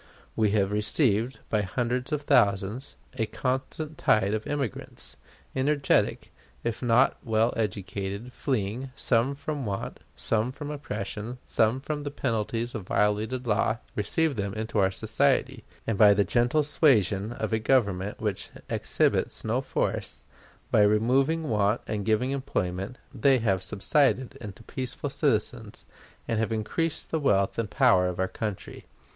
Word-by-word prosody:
We 110 Hz, -2 st, +3 dB
have 100 Hz, -1 st, +1 dB
received, 110 Hz, +3 st, +1 dB
by 105 Hz, -, +1 dB
hundreds 125 Hz, +6 st, -2 dB
of 150 Hz, -1 st, -1 dB
thousands, 100 Hz, +2 st, +2 dB, 0.2 s
a 110 Hz, -, +1 dB
constant 135 Hz, +5 st, -3 dB
tide 105 Hz, -2 st, +3 dB
of 110 Hz, 0 st, -2 dB
immigrants 135 Hz, -, -4 dB, 0.4 s
energetic, 140 Hz, +2 st, +1 dB, 0.3 s
if 120 Hz, 0 st, -2 dB
not 120 Hz, -1 st, +3 dB
well 110 Hz, 0 st, +2 dB
educated, 100 Hz, +2 st, -3 dB
fleeing, 125 Hz, 0 st, -2 dB
some 125 Hz, +3 st, +1 dB
from 145 Hz, 0 st, -4 dB
want, 100 Hz, -1 st, -4 dB, 0.2 s
some 110 Hz, +3 st, 0 dB
from 145 Hz, +2 st, -6 dB
oppression, 115 Hz, -4 st, -5 dB
some 115 Hz, +3 st, +2 dB
from 150 Hz, +2 st, -4 dB
the 145 Hz, -, -4 dB
penalties 115 Hz, -3 st, -2 dB
of 100 Hz, -5 st, -6 dB
violated 110 Hz, +5 st, 0 dB
law 110 Hz, 0 st, +1 dB, 0.2 s
received 140 Hz, +7 st, +1 dB
them 100 Hz, 0 st, -2 dB
into 110 Hz, 0 st, -2 dB
our 95 Hz, -1 st, +4 dB
society; 125 Hz, +4 st, +1 dB, 0.2 s
and 110 Hz, -3 st, -1 dB
by 105 Hz, -2 st, +8 dB
the 100 Hz, -, +4 dB
gentle 120 Hz, +8 st, +2 dB
suasion 110 Hz, -, +3 dB
of 120 Hz, -, -3 dB
a 110 Hz, -, +2 dB
Government 105 Hz, -5 st, +1 dB
which 105 Hz, -3 st, -3 dB, 0.2 s
exhibits -, -, +1 dB
no -, -, +1 dB
force, -, -, -2 dB, 0.5 s
by -, -, +5 dB
removing 130 Hz, +10 st, +3 dB
want 105 Hz, -1 st, +2 dB
and 105 Hz, -2 st, -3 dB
giving 115 Hz, +4 st, +2 dB
employment, 95 Hz, -5 st, -3 dB, 0.2 s
they 135 Hz, -2 st, +4 dB
have 100 Hz, -6 st, +1 dB
subsided 130 Hz, +6 st, +1 dB
into 105 Hz, 0 st, -9 dB
peaceful 130 Hz, +1 st, -4 dB
citizens, -, -, -1 dB, 0.4 s
and 115 Hz, -, 0 dB
have 115 Hz, 0 st, 0 dB
increased 150 Hz, +9 st, -2 dB
the 160 Hz, -, +1 dB
wealth 100 Hz, -8 st, +2 dB
and 110 Hz, -3 st, -1 dB
power 115 Hz, -9 st, +4 dB
of 90 Hz, -, -3 dB
our 95 Hz, -, +1 dB
country. 105 Hz, -1 st, -6 dB
115 Hz, 145 wpm, -27 LUFS, 105-130 Hz, 0.5 s, by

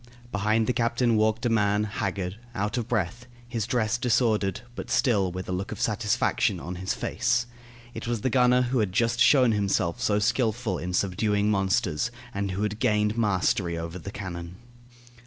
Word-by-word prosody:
Behind 110 Hz, +2 st, +1 dB
the 125 Hz, -, +1 dB
captain 120 Hz, 0 st, +1 dB
walked 110 Hz, +2 st, +1 dB
a -, -, +3 dB
man, 105 Hz, -2 st, +2 dB
haggard, 100 Hz, -2 st, -3 dB, 0.2 s
out 105 Hz, +1 st, -1 dB
of 120 Hz, -2 st, -2 dB
breath, 120 Hz, +1 st, -2 dB, 0.2 s
his 115 Hz, -3 st, -3 dB
dress 120 Hz, -1 st, 0 dB
disordered, 110 Hz, -5 st, +1 dB
but -, -, -7 dB
still 100 Hz, -8 st, +2 dB
with 90 Hz, +1 st, -6 dB
a -, -, -4 dB
look 95 Hz, +2 st, -3 dB
of -, -, -6 dB
satisfaction 105 Hz, -1 st, +1 dB
on 90 Hz, +5 st, -6 dB
his 95 Hz, +1 st, -2 dB
face. 120 Hz, 0 st, 0 dB, 0.5 s
It 115 Hz, -, -6 dB
was 120 Hz, -3 st, -1 dB
the 130 Hz, -, 0 dB
gunner 125 Hz, 0 st, +4 dB
who 125 Hz, +1 st, 0 dB
had 100 Hz, -4 st, 0 dB
just 115 Hz, +1 st, +1 dB
shown 130 Hz, -4 st, +6 dB
himself 100 Hz, -5 st, 0 dB
so 105 Hz, -, +2 dB
skilful 115 Hz, -2 st, 0 dB
in 90 Hz, +1 st, -4 dB
subduing 105 Hz, +2 st, +1 dB
monsters, 95 Hz, -3 st, +1 dB, 0.2 s
and 100 Hz, 0 st, -2 dB
who 95 Hz, +3 st, -2 dB
had 105 Hz, +1 st, -2 dB
gained 105 Hz, -3 st, +2 dB
the 115 Hz, -, -4 dB
mastery 95 Hz, -4 st, +1 dB
over 85 Hz, +2 st, -5 dB
the 95 Hz, -, -7 dB
cannon. 90 Hz, -4 st, -7 dB
105 Hz, 180 wpm, -26 LUFS, 95-115 Hz, 0.5 s, shown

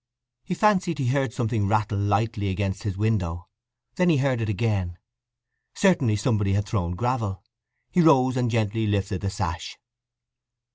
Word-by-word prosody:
He 180 Hz, -, -3 dB
fancied 190 Hz, -5 st, +2 dB
he 135 Hz, -4 st, 0 dB
heard 135 Hz, -2 st, +1 dB
something 110 Hz, -3 st, -1 dB
rattle 105 Hz, 0 st, 0 dB
lightly 100 Hz, 0 st, 0 dB
against 95 Hz, 0 st, -2 dB
his 100 Hz, -3 st, -4 dB
window; 95 Hz, -5 st, -1 dB, 0.5 s
then 180 Hz, -1 st, +3 dB
he 160 Hz, -, +4 dB
heard 130 Hz, -3 st, +1 dB
it 110 Hz, -, -2 dB
again. 100 Hz, -5 st, -1 dB, 0.8 s
Certainly 145 Hz, -, +3 dB
somebody 105 Hz, -2 st, +1 dB
had 100 Hz, +1 st, 0 dB
thrown 90 Hz, -4 st, -2 dB
gravel. 110 Hz, -4 st, -2 dB, 0.5 s
He 180 Hz, -, +3 dB
rose 130 Hz, -6 st, +5 dB
and 125 Hz, -2 st, +1 dB
gently 110 Hz, -1 st, 0 dB
lifted 100 Hz, -2 st, -1 dB
the 100 Hz, -, -1 dB
sash. 85 Hz, -3 st, -4 dB
110 Hz, 150 wpm, -25 LUFS, 100-125 Hz, 0.8 s, rose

